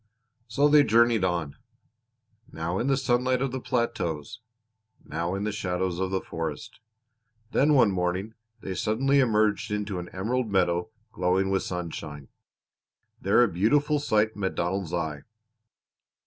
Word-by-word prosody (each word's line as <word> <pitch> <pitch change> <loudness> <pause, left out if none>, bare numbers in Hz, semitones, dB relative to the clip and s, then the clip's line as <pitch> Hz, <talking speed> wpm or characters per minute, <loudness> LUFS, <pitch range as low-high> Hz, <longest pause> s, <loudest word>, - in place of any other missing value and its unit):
So 140 +6 +3
they 150 0 +6
journeyed 115 -3 +3
on 85 -6 -1 0.9
now 80 +3 -3
in 125 - -1
the 135 -1 +2
sunlight 125 -1 +1
of 135 0 -1
the 130 - -3
plateaus, 115 - -2 0.7
now 85 +3 -3
in 100 - -3
the 105 - -1
shadows 90 -3 -2
of 95 0 -1
the 95 0 -1
forest. 80 -3 -6 0.7
Then 150 +2 +3
one 115 -6 +5
morning 90 +3 -2 0.3
they 95 - -4
suddenly 130 +9 +1
emerged 110 -3 +2
into 105 -2 -3
an 90 - -7
emerald 115 +5 -2
meadow 90 -2 +1 0.2
glowing 95 +2 +1
with 95 - +1
sunshine. 75 -5 -6 0.9
There 100 +5 +4
a - - +4
beautiful 145 - +2
sight 110 -5 +1
met 95 -2 -2
Donald's 90 0 -2
eye. 80 -4 -3
100 Hz, 140 wpm, -26 LUFS, 90-120 Hz, 0.9 s, they